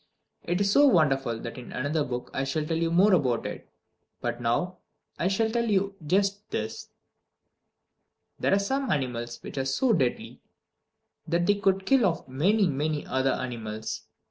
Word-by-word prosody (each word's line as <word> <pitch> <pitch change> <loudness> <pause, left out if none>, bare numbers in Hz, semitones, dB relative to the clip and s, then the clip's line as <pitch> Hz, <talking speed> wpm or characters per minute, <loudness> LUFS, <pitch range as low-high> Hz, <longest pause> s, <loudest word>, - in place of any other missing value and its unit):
It 175 +2 0
is 200 0 +2
so 285 +6 +6
wonderful 135 - +3
that 120 +2 -6
in 125 - -10
another 145 +4 -1
book 125 -2 -5
I 135 - -1
shall 150 +3 -1
tell 165 +1 -1
you 165 0 +1
more 190 +5 +5
about 130 -9 +2
it. - - -6 0.5
But 120 0 -3
now 175 +11 -1 0.4
I 175 - +1
shall 220 +4 +1
tell 235 0 0
you 200 -1 +1
just 200 +5 0
this: 110 +1 -4 1.5
There - - +1
are - - +3
some 265 +6 -1
animals 120 -7 -2
which - - -5
are - - +1
so 225 - +2
deadly 130 - -1 0.9
that 170 +1 +1
they 205 - +4
could 195 -2 +1
kill 265 -6 +4
off 165 -6 -3
many, 190 +11 +2
many 150 0 -1
other 130 0 +1
animals. 110 -3 -5
160 Hz, 170 wpm, -27 LUFS, 130-200 Hz, 1.5 s, so